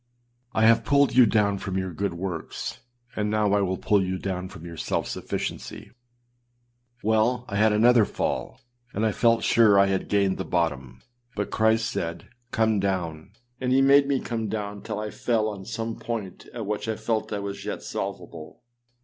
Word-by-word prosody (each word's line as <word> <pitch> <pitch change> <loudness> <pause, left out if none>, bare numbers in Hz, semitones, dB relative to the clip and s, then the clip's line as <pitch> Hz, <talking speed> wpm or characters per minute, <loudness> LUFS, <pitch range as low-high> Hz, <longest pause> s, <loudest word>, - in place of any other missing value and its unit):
I 110 - +3
have 115 0 +5
pulled 140 -1 +3
you 125 -2 +7
down 100 -2 +2
from 95 -1 -3
your 95 -1 -3
good 95 0 -2
works, 85 -2 -5 0.4
and 105 0 -1
now 105 -1 +2
I 105 - +3
will 95 -1 0
pull 100 +1 +2
you 95 0 -2
down 95 -1 -4
from 85 - -11
your 85 -1 -8
self - - -2
sufficiency.â - - -5 1.1
Well, 110 +3 +2
I 100 - -3
had 110 +1 +4
another 115 +2 +5
fall, - - -3 0.3
and 105 +3 +1
I 110 - +2
felt 115 +1 +2
sure 110 -4 +5
I 100 - +6
had 95 -1 -1
gained 100 -2 +2
the - - -1
bottom, 75 -7 -2 0.3
but 100 -1 -3
Christ 110 +1 +2
said 85 0 -4 0.2
âCome 110 -2 +2
down!â 85 -5 -2 0.3
and 125 -1 -1
he 135 +1 +5
made 140 +1 +6
me 140 -2 +1
come 115 -2 -3
down 105 -1 -4
till 110 -2 -5
I 105 0 -4
fell 115 -3 0
on 100 -3 -6
some 115 +2 -4
point 110 -6 -5
at 115 -3 -5
which 105 +2 -3
I 110 - -1
felt 110 0 -2
I 105 - -1
was 100 0 -5
yet - - -5
salvable. 90 -4 -6
105 Hz, 185 wpm, -25 LUFS, 95-110 Hz, 1.1 s, you